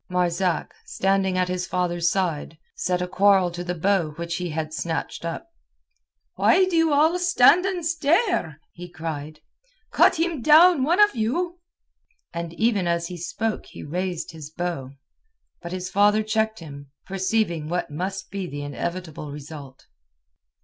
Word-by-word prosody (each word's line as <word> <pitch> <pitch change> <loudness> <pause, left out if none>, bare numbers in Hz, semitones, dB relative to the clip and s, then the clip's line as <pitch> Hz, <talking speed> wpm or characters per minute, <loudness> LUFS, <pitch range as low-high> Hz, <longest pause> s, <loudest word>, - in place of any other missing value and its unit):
Marzak, 180 0 0
standing 190 -1 0
at 180 0 +1
his 180 0 -3
father's 175 -2 0
side, 165 -5 -2 0.2
set 180 0 -1
a - - -3
quarrel 190 -1 +3
to 175 +1 -5
the 180 0 -3
bow 175 -3 +1
which 170 +2 -4
he 180 -1 -3
had 155 0 -4
snatched 165 0 -3
up. 170 - -4 0.9
"Why 375 +1 +4
do 370 -2 -2
you 325 -1 +3
all 315 +5 +3
stand 350 +1 +5
and 360 -4 -3
stare?" 325 - +1
he 175 0 -10
cried. 155 -2 -6 0.5
"Cut - - +5
him 330 -5 0
down, 315 +3 +7
one 330 +8 +2
of 415 -5 +5
you!" 335 +11 -1 0.7
And 170 0 -4
even 210 -3 +1
as 170 0 -1
he 180 - -6
spoke 215 +6 -3
he - - -10
raised 180 +2 -3
his 155 -3 -9
bow. 160 -5 -4 0.7
But 170 - -7
his 185 0 -5
father 205 +2 +4
checked 220 -1 -1
him, 140 -3 -10 0.2
perceiving 190 -4 -1
what 175 -2 -2
must 190 +5 -4
be 195 -2 -4
the 145 -2 -6
inevitable 155 0 -5
result. 145 -2 -10
180 Hz, 155 wpm, -24 LUFS, 165-220 Hz, 0.9 s, down